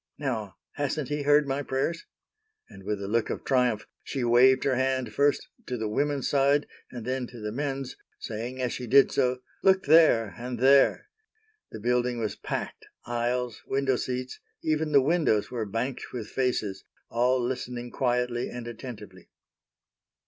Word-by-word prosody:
Now, 115 -9 -3 0.2
hasn't 145 0 -2
He 150 0 -1
heard 145 0 +4
my 135 +1 -1
prayers?" 145 +5 -2 0.6
And - - -13
with 105 -1 -2
a - - -4
look 115 +2 0
of - - -4
triumph 125 -5 +1 0.2
she 135 - -3
waved 125 +2 +5
her 135 - +2
hand 130 -3 0
first 145 +4 +2 0.2
to 125 - -3
the 110 -1 -2
women's 140 +4 0
side 140 +1 +3 0.2
and 120 -3 -8
then 130 0 -2
to 120 - -11
the 105 0 -4
men's, 135 +1 -3 0.2
saying 120 +4 -5
as 125 -2 -1
she 125 - -5
did 135 +4 +6
so,—"Look 130 +9 +1
there, 145 -9 +5
and 125 0 -4
there!" 135 +3 +4 0.6
The - - -7
building 125 +2 +1
was 110 -2 -2
packed, - - -5 0.2
aisles, 120 0 -2
window 135 -1 +1
seats, 125 +1 -4 0.2
even 155 0 0
the 140 -2 +5
windows 140 -10 +2
were 115 -4 -3
banked 115 +6 -3
with 115 -4 -6
faces, 115 -7 -1 0.3
all 125 +2 +2
listening 120 -1 -4
quietly 125 -1 0
and 120 -1 -7
attentively. 110 -6 -9
125 Hz, 155 wpm, -27 LUFS, 120-135 Hz, 0.6 s, did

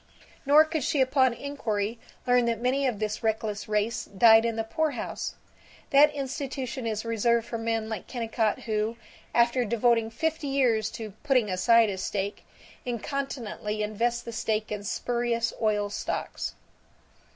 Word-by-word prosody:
Nor 300 +2 +7
could 315 -2 -2
she 295 +1 0
upon 260 -1 +4
inquiry 225 -6 -3 0.3
learn 245 -1 +4
that 230 -2 0
many 260 +3 +1
of 240 -5 -1
this 215 0 -3
reckless 220 -2 -2
race 215 +2 0
died 225 +3 +6
in 230 -1 0
the 225 - -1
poorhouse. 285 +4 -2 0.6
That 290 +2 +7
institution 265 -2 -4
is 220 0 -2
reserved 230 +1 +1
for 230 - -4
men 225 -1 -1
like 220 -4 -5
Kennicott 225 -3 -1
who, 220 +1 -1 0.4
after 240 +1 +3
devoting 230 0 +2
fifty 315 +6 -2
years 240 -6 +2
to 220 -3 -7
"putting 255 -8 +2
aside 225 +4 +4
a 190 - -5
stake," 200 +1 -3 0.4
incontinently 235 -4 -3
invest 235 +3 -1
the 235 - -5
stake 215 -1 -1
in 210 -1 -4
spurious 235 +2 -1
oil 210 -2 +1
stocks. - - -4
230 Hz, 145 wpm, -27 LUFS, 215-255 Hz, 0.6 s, Nor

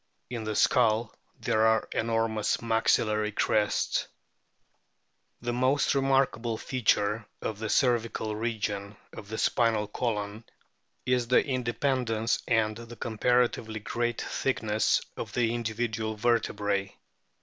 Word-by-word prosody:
In 115 -3 -4
the 110 0 -2
skull 115 -1 +3 0.3
there 110 +1 +3
are 110 0 +2
enormous 115 -1 0
maxillary 110 -2 +1
crests. 105 0 +1 1.3
The 120 0 -2
most 130 +3 +2
remarkable 135 -4 +1
feature 110 -3 0
of 105 -2 -4
the 110 -1 -3
cervical 115 -4 +1
region 105 -2 -3 0.2
of 100 - -10
the 110 - -4
spinal 115 -3 +2
column 105 -1 -3 0.6
is 125 -1 +1
the 125 - +4
independence 125 -3 0
and 110 -2 +2
the 115 0 -10
comparatively 115 -1 0
great 120 +2 -2
thickness 110 -5 0 0.2
of - - -6
the 115 -2 +1
individual 110 -1 -2
vertebrae. 105 -3 0
115 Hz, 110 wpm, -28 LUFS, 110-120 Hz, 1.3 s, the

